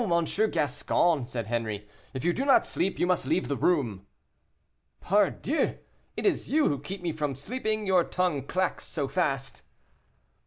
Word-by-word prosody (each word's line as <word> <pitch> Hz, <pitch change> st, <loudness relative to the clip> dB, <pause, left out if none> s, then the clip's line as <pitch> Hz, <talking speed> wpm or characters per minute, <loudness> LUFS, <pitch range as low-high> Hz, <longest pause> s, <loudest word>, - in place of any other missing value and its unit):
M. 170 Hz, 0 st, +3 dB, 0.2 s
Gascon," 155 Hz, 0 st, +1 dB
said 120 Hz, -2 st, -4 dB
Henri, 110 Hz, -2 st, -3 dB, 0.3 s
"if 130 Hz, -, -4 dB
you 175 Hz, -, +3 dB
do 265 Hz, -, -1 dB
not 275 Hz, -1 st, +5 dB
sleep, 190 Hz, -, -1 dB
you -, -, +2 dB
must 180 Hz, -7 st, +1 dB
leave 165 Hz, +6 st, +1 dB
the 140 Hz, -, -1 dB
room." 120 Hz, -, 0 dB, 0.9 s
"Pardieu, 210 Hz, -, +1 dB, 0.4 s
it -, -, -3 dB
is 395 Hz, -, +1 dB
you 305 Hz, +2 st, +3 dB
who 140 Hz, -, -1 dB
keep 180 Hz, +6 st, -7 dB
me 170 Hz, -, 0 dB
from 150 Hz, -3 st, -2 dB
sleeping, 215 Hz, -, -2 dB
your 185 Hz, -3 st, +4 dB
tongue 170 Hz, -8 st, -1 dB
clacks 185 Hz, 0 st, -1 dB
so 145 Hz, -4 st, -2 dB
fast." 135 Hz, -3 st, -1 dB
165 Hz, 160 wpm, -28 LUFS, 135-185 Hz, 0.9 s, not